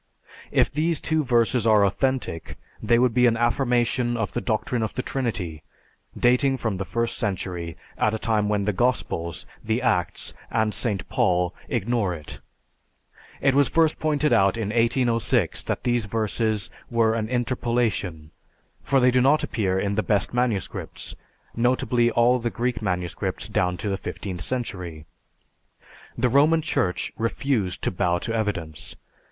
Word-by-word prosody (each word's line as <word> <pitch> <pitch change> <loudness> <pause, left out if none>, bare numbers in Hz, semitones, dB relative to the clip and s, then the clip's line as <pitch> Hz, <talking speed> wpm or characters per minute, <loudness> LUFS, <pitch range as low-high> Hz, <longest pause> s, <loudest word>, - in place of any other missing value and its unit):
If - - +2
these 155 +2 +1
two 160 0 0
verses 120 -2 +2
are 105 -2 +5
authentic, 125 - -1 0.2
they 120 - +3
would 125 -1 +3
be 125 0 +5
an 115 -1 +2
affirmation 120 0 +1
of 115 -3 -2
the 120 - -1
doctrine 115 +1 -1
of 110 - -3
the 125 - -2
Trinity, 100 - -3 0.6
dating 125 +2 +3
from 110 -6 -2
the 95 - -3
first 115 +2 -2
century, 90 -6 -3 0.2
at 110 +1 +2
a - - -1
time 110 -2 0
when 105 -1 0
the 105 - +1
Gospels, 90 -7 -1 0.2
the - - 0
Acts, - - 0 0.2
and 110 -2 +1
St. 105 -6 -2
Paul 90 -1 +1 0.2
ignore 105 -4 0
it. 75 -3 -10 1.0
It 135 -1 +3
was 140 0 +4
first 160 -1 +2
pointed 150 -1 +1
out 95 +3 +3
in 110 -3 -2
1806 115 -3 +1
that - - -2
these 120 -2 +1
verses 110 -3 -1 0.2
were 115 -2 +2
an 110 -1 -2
interpolation, 115 -10 -1 0.5
for 135 - +2
they 125 0 +5
do 125 0 +3
not 140 +4 +4
appear 95 -4 0
in 100 +1 -1
the 110 - +1
best 105 -1 0
manuscripts, 120 -6 -2 0.4
notably 120 0 +2
all 120 +2 +3
the 120 0 -1
Greek 120 -1 -2
manuscripts 90 -4 -2
down 90 0 0
to 95 - -4
the 95 - -1
fifteenth 95 -3 -6
century. 90 -9 -4 1.1
The - - +2
Roman 150 +5 +4
Church 90 - -1
refused 115 -4 -1
to - - +1
bow 90 -1 +1
to 115 +6 -4
evidence. 105 -9 -3
115 Hz, 155 wpm, -24 LUFS, 100-125 Hz, 1.1 s, are